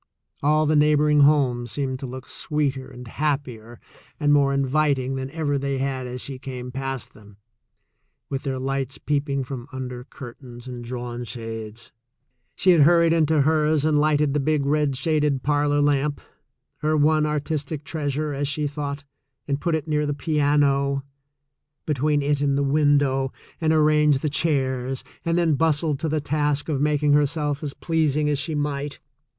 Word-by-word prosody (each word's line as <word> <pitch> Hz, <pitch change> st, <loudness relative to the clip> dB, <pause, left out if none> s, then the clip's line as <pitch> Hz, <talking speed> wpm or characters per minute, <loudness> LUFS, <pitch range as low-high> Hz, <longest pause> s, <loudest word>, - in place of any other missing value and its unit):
All 155 Hz, +1 st, +3 dB
the 155 Hz, +1 st, +2 dB
neighboring 150 Hz, 0 st, +4 dB
homes 135 Hz, -5 st, +3 dB
seemed 130 Hz, +1 st, -2 dB
to 135 Hz, -, -5 dB
look 130 Hz, +1 st, -8 dB
sweeter 140 Hz, -3 st, -2 dB
and 125 Hz, -2 st, -11 dB
happier 125 Hz, -5 st, -3 dB, 0.4 s
and 145 Hz, -1 st, +3 dB
more 140 Hz, -1 st, +4 dB
inviting 140 Hz, -1 st, +1 dB
than 130 Hz, 0 st, -4 dB
ever 145 Hz, -2 st, -1 dB
they 140 Hz, 0 st, -2 dB
had 130 Hz, -1 st, -2 dB
as 125 Hz, 0 st, -6 dB
she 135 Hz, -2 st, -6 dB
came 125 Hz, -2 st, -7 dB
past 135 Hz, -1 st, -5 dB
them, 105 Hz, -2 st, -17 dB, 0.9 s
with 135 Hz, -1 st, -3 dB
their 135 Hz, -2 st, -3 dB
lights 135 Hz, 0 st, -3 dB
peeping 140 Hz, -1 st, -1 dB
from 130 Hz, -1 st, -7 dB
under 125 Hz, -2 st, -6 dB
curtains 120 Hz, -2 st, -11 dB
and 125 Hz, -1 st, -7 dB
drawn 120 Hz, 0 st, -5 dB
shades. 115 Hz, -1 st, -7 dB, 0.6 s
She 185 Hz, -, +4 dB
had 170 Hz, -3 st, +5 dB
hurried 170 Hz, +2 st, +5 dB
into 160 Hz, -2 st, +3 dB
hers 155 Hz, 0 st, +2 dB
and 155 Hz, -1 st, +3 dB
lighted 150 Hz, -2 st, +2 dB
the 150 Hz, -, +1 dB
big 145 Hz, 0 st, +1 dB
red 145 Hz, -1 st, +1 dB
shaded 150 Hz, -2 st, 0 dB
parlor 145 Hz, 0 st, +2 dB
lamp, 145 Hz, 0 st, +1 dB, 0.6 s
her 155 Hz, +1 st, 0 dB
one 155 Hz, +1 st, +3 dB
artistic 150 Hz, 0 st, -3 dB
treasure, 150 Hz, -1 st, -2 dB
as 140 Hz, +1 st, -2 dB
she 150 Hz, +1 st, -2 dB
thought, 145 Hz, -1 st, -4 dB, 0.4 s
and 140 Hz, 0 st, -1 dB
put 170 Hz, -2 st, +1 dB
it 160 Hz, 0 st, -3 dB
near 150 Hz, -1 st, 0 dB
the 145 Hz, -, -1 dB
piano, 140 Hz, -2 st, +1 dB, 0.8 s
between* 150 Hz, 0 st, +1 dB
it 145 Hz, 0 st, 0 dB
and 140 Hz, -1 st, +1 dB
the 140 Hz, -, +1 dB
window, 140 Hz, -2 st, +2 dB, 0.3 s
and 160 Hz, -1 st, +2 dB
arranged 150 Hz, -2 st, +4 dB
the 150 Hz, -, -1 dB
chairs, 135 Hz, -4 st, 0 dB, 0.2 s
and 165 Hz, 0 st, 0 dB
then 170 Hz, -3 st, +3 dB
bustled 155 Hz, -1 st, +1 dB
to 160 Hz, -, -2 dB
the 155 Hz, +1 st, 0 dB
task 145 Hz, 0 st, -1 dB
of 140 Hz, -3 st, 0 dB
making 150 Hz, 0 st, +2 dB
herself 145 Hz, 0 st, +1 dB
as 145 Hz, -3 st, -5 dB
pleasing 155 Hz, -3 st, 0 dB
as 145 Hz, -, 0 dB
she 155 Hz, +2 st, -2 dB
might. 145 Hz, -1 st, -2 dB
145 Hz, 165 wpm, -23 LUFS, 135-150 Hz, 0.9 s, had